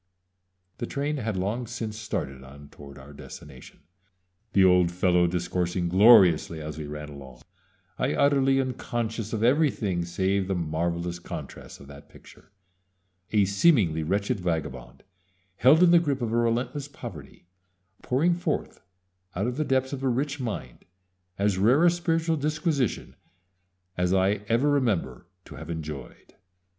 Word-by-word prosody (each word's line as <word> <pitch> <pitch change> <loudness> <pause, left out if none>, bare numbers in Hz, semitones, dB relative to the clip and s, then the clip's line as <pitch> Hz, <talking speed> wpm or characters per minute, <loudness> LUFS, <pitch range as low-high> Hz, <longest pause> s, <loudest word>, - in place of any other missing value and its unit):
The - - -3
train 145 +2 -2
had 110 -6 -3
long 110 +6 -2
since 115 -2 -5
started 70 -12 -5
on 70 +2 -13
toward 70 -1 -13
our 70 +2 -13
destination, 70 -1 -12 0.7
the 95 - +5
old 90 -2 +4
fellow 90 -1 +2
discoursing 90 0 -2
gloriously 95 -5 +5
as 75 -1 -6
we 75 - -6
ran 75 0 -7
along, 65 -4 -12 0.6
I - - 0
utterly 135 -1 +3
unconscious 120 -4 -3
of 110 -1 -2
everything 115 - +1
save 95 +2 -1
the 95 - -1
marvelous 85 +1 -2
contrasts - - -9
of 70 - -13
that 70 0 -13
picture - - -18 0.8
a 105 -2 +3
seemingly 100 - +3
wretched 100 +7 -1
vagabond, 80 -8 -4 0.5
held 150 +7 +5
in 175 - +6
the 175 - +7
grip 140 -6 -2
of 115 -1 -2
a - - +1
relentless 120 +5 -1
poverty, 95 - -11 0.6
pouring 155 +8 +1
forth 170 -3 -3 0.5
out 100 +4 -1
of 125 0 -2
the 155 - +1
depths 130 -1 0
of 135 - -5
a 135 - +1
rich 140 +4 -2
mind 105 - -6 0.5
as 100 -1 0
rare 125 - +4
a 175 - +6
spiritual 165 -1 0
disquisition 150 - -1 0.8
as 90 +1 +1
I 95 +2 +1
ever 115 +6 +2
remember 110 - -1 0.2
to - - -11
have - - -9
enjoyed. 75 -5 -7
100 Hz, 145 wpm, -26 LUFS, 85-130 Hz, 0.8 s, the